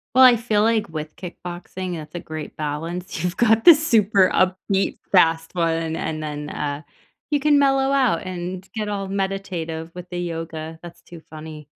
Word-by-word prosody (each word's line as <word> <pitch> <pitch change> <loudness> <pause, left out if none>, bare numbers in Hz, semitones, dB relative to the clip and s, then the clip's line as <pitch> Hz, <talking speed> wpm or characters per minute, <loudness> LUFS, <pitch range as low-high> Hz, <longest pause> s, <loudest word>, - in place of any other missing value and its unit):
Well, 260 0 +8
I 245 -2 +8
feel 215 -2 +1
like 220 -1 +2
with 155 -1 -6
kickboxing, 180 0 -6
that's 155 -1 -8
a 175 - -4
great 155 -2 -7
balance. 165 +4 -4
You've 180 0 -2
got 225 -1 +3
the 340 - +11
super 215 - +3
upbeat 190 +1 +1 0.2
fast 165 -3 +3
one, 165 -1 0
and 155 -1 -3
then, 150 -1 -5
uh, 145 0 -3 0.5
you 295 -1 +2
can 295 0 +4
mellow 270 -1 +3
out 260 -11 +2
and 185 +1 -5
get 215 -1 -2
all 200 -1 -3
meditative 190 -5 -3
with 180 0 -9
the 175 - -5
yoga, 165 -2 -5
that's 170 0 -12
too 170 -1 -12
funny. 155 -1 -9
175 Hz, 175 wpm, -22 LUFS, 160-205 Hz, 0.5 s, the